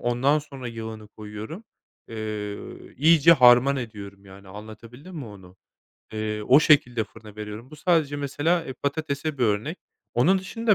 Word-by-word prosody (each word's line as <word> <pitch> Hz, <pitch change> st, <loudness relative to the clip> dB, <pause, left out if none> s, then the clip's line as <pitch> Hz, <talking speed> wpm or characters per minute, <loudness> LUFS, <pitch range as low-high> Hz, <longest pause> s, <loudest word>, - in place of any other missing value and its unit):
ondan 125 Hz, +5 st, +2 dB
sonra 140 Hz, -4 st, -8 dB
yağını 110 Hz, -2 st, -8 dB
koyuyorum, 110 Hz, -, -9 dB, 0.4 s
eee, 105 Hz, -2 st, -5 dB, 0.4 s
iyice 160 Hz, +2 st, +6 dB
harman 125 Hz, -1 st, +6 dB
ediyorum 100 Hz, -5 st, -8 dB
yani, 95 Hz, 0 st, -14 dB
anlatabildim 115 Hz, -, -11 dB
mi 145 Hz, -, -5 dB
onu? 95 Hz, -4 st, -13 dB, 0.6 s
Eee, 110 Hz, 0 st, -3 dB
o 130 Hz, +7 st, +6 dB
şekilde 125 Hz, -8 st, +3 dB
fırına 110 Hz, -1 st, -15 dB
veriyorum. 105 Hz, +4 st, -8 dB
Bu 155 Hz, -, -11 dB
sadece 155 Hz, -3 st, +1 dB
mesela 145 Hz, +4 st, 0 dB
e, 130 Hz, -, -6 dB
patatese 140 Hz, +1 st, -3 dB
bir 125 Hz, -, +2 dB
örnek. 110 Hz, -, -1 dB, 0.4 s
Onun 180 Hz, +11 st, +4 dB
dışında 215 Hz, +3 st, 0 dB
120 Hz, 145 wpm, -25 LUFS, 105-150 Hz, 0.6 s, iyice